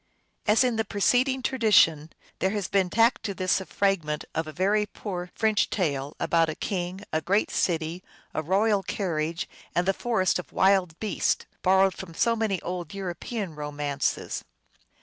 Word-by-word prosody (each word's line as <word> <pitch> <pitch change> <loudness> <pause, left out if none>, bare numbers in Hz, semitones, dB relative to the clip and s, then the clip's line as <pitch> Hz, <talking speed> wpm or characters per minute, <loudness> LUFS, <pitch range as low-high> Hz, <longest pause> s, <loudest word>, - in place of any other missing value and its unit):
As 215 +4 +5
in 245 -3 +1
the 220 - +2
preceding 250 +6 +1
tradition, 205 - +4 0.3
there 190 - +2
has 205 -2 -2
been 195 -3 +1
tacked 230 +5 +3
to 200 - -3
this 185 +1 +1
a 190 - -9
fragment 165 -7 0
of 160 0 -2
a - - -5
very 205 +5 +1
poor 180 -4 -6
French 220 -2 +2
tale 145 -6 -1
about 165 -1 +2
a 155 - -3
king, 185 -1 -3
a 155 - +1
great 195 +6 +1
city, 165 +1 -1 0.3
a - - -1
royal 200 +5 +2
carriage, 170 -4 -2 0.3
and 175 +1 +1
the 195 - +4
forest 190 -5 +1
of 180 - -8
wild 190 -4 +2
beasts, 215 -3 0 0.2
borrowed 190 0 +4
from 170 -4 -9
so 235 +4 +2
many 215 -4 0
old 175 -1 -5
European 190 +1 -4
ro 150 -1 -5
mances. 145 -1 -2
190 Hz, 170 wpm, -26 LUFS, 165-210 Hz, 0.3 s, As